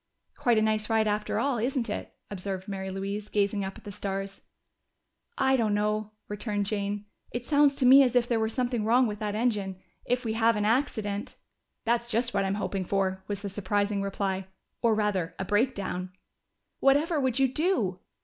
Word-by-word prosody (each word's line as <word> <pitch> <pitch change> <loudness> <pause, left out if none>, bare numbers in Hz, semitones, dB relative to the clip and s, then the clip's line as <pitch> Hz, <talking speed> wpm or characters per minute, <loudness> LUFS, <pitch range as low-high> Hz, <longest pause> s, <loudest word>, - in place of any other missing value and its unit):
"Quite 245 -6 +2
a 215 - +4
nice 215 -1 +1
ride 220 -1 +3
after 210 0 -1
all, 275 -4 +1
isn't 245 +1 0
it?" 210 - -5 0.2
observed 190 -1 -4
Mary 190 -1 -4
Louise, 200 +2 -4
gazing 200 0 +1
up 190 0 -5
at - - -14
the 205 - -7
stars. 195 -1 -4 1.0
"I 265 0 +3
don't 220 -5 +1
know," 210 0 -1
returned 210 -1 -2
Jane. 205 0 -2 0.2
"It 240 +1 -5
sounds 285 -1 +4
to 260 - +1
me 265 +2 +9
as 250 -2 +3
if 245 -1 +4
there 235 -2 +1
were 220 0 +1
something 245 -1 -1
wrong 245 +4 +4
with 210 -2 -3
that 210 -1 -2
engine. 210 -5 -1 0.3
If 245 0 0
we 220 - 0
have 225 0 +3
an 210 0 0
accident 215 -4 0 0.2
" - - -52
"That's 235 +1 +1
just 235 +1 0
what 195 -1 +1
I'm 195 +1 0
hoping 200 -2 -2
for," 190 0 -1
was 205 0 -4
the 200 - -3
surprising 200 +1 0
reply. 195 -1 -2 0.3
"Or 230 -2 +3
rather, 205 -5 0
a 190 - -3
breakdown." 200 -4 0 0.7
"Whatever 295 +4 +3
would 260 -3 +1
you 270 0 +4
do?" 255 - 0
210 Hz, 190 wpm, -28 LUFS, 200-240 Hz, 1.0 s, me